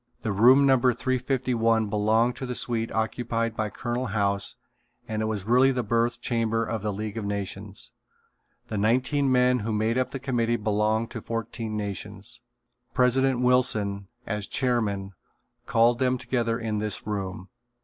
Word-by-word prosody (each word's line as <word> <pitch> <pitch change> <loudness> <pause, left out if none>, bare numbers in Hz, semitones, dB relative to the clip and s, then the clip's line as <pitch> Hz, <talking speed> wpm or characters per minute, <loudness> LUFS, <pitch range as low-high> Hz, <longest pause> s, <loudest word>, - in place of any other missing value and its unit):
The 110 - -1
room 125 +8 +6
number 130 -3 +4
351 125 -3 +1
belonged 110 +4 +2
to 130 - -5
the 125 - -3
suite 115 -2 -1
occupied 115 0 -1
by 110 -1 -1
Colonel 120 +3 -3
House 100 -1 0 0.5
and 110 0 -2
it - - 0
was 110 -3 -2
really 125 +4 +5
the 125 -2 -1
birth 115 +2 0
chamber 115 -1 0
of 110 -1 -3
the 105 0 -1
League 105 +2 -5
of - - -5
Nations. 100 0 -5 0.8
The 105 - -3
nineteen 130 +6 +2
men 125 0 +4
who 110 +1 -3
made 110 +3 +1
up 130 - 0
the - - -5
committee 120 -3 0
belonged 110 +1 0
to 115 - -6
fourteen 115 -1 -4
nations. 105 +2 -6 0.5
President 125 0 +3
Wilson, 105 -6 +2 0.2
as 105 -2 -3
chairman, 105 -7 -1 0.6
called 115 +1 +3
them 130 0 +2
together 120 -2 -1
in 110 -3 -2
this 105 -2 -3
room. 95 -3 -4
115 Hz, 155 wpm, -26 LUFS, 105-125 Hz, 0.8 s, room